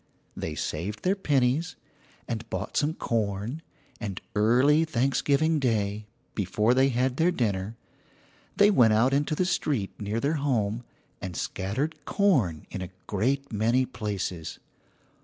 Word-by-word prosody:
They 80 Hz, -, -4 dB
saved 95 Hz, +9 st, -4 dB
their 185 Hz, +2 st, +2 dB
pennies, 145 Hz, -2 st, +1 dB, 0.5 s
and 115 Hz, -1 st, -4 dB
bought -, -, -4 dB
some 155 Hz, +2 st, +1 dB
corn, 110 Hz, +5 st, -2 dB, 0.4 s
and 100 Hz, -5 st, -4 dB
early 125 Hz, +9 st, +4 dB
Thanksgiving 145 Hz, +2 st, +2 dB
Day, 105 Hz, -5 st, 0 dB, 0.3 s
before 105 Hz, +4 st, +1 dB
they 135 Hz, +1 st, +4 dB
had 130 Hz, +1 st, 0 dB
their 165 Hz, +2 st, +4 dB
dinner, 110 Hz, -, -1 dB, 0.8 s
they 205 Hz, +1 st, +6 dB
went 120 Hz, -, +5 dB
out 120 Hz, +5 st, +3 dB
into 145 Hz, +2 st, +1 dB
the 180 Hz, -, +1 dB
street 145 Hz, -, 0 dB
near 105 Hz, +2 st, -1 dB
their 145 Hz, +5 st, 0 dB
home, 115 Hz, -5 st, 0 dB, 0.4 s
and 90 Hz, -4 st, -5 dB
scattered 130 Hz, +12 st, -3 dB
corn 130 Hz, -, +1 dB
in 95 Hz, -, -4 dB
a 90 Hz, -, -5 dB, 0.2 s
great 130 Hz, +6 st, -1 dB
many 115 Hz, +5 st, +2 dB
places. 95 Hz, -8 st, -4 dB
120 Hz, 135 wpm, -27 LUFS, 105-145 Hz, 0.8 s, they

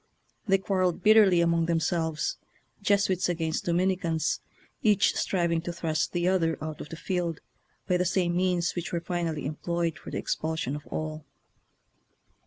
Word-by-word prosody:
They 195 Hz, -1 st, +5 dB
quar 195 Hz, 0 st, -1 dB
relled 180 Hz, -2 st, +1 dB
bitterly 210 Hz, -5 st, +6 dB
among 170 Hz, -1 st, +2 dB
themselves, 160 Hz, -1 st, 0 dB, 0.4 s
Jesuits 200 Hz, -3 st, +2 dB
against 165 Hz, -2 st, -1 dB
Dominicans, 175 Hz, -2 st, +1 dB, 0.4 s
each 210 Hz, -2 st, +4 dB
striving 170 Hz, -3 st, +1 dB
to 175 Hz, -, -4 dB
thrust 160 Hz, -2 st, -1 dB
the 175 Hz, 0 st, 0 dB
other 170 Hz, -4 st, +2 dB
out 155 Hz, 0 st, -5 dB
of -, -, -8 dB
the -, -, -6 dB
field 175 Hz, -2 st, -2 dB, 0.5 s
by 180 Hz, -, +3 dB
the 180 Hz, -, +1 dB
same 175 Hz, -1 st, +1 dB
means 180 Hz, -1 st, +1 dB
which 175 Hz, +1 st, -4 dB
were 170 Hz, -, 0 dB
finally 170 Hz, -3 st, -2 dB
employed 170 Hz, +2 st, -2 dB
for -, -, -9 dB
the -, -, -4 dB
expulsion 160 Hz, -3 st, -2 dB
of 150 Hz, -, -9 dB
all. 155 Hz, -1 st, -5 dB
170 Hz, 155 wpm, -28 LUFS, 160-185 Hz, 0.5 s, bitterly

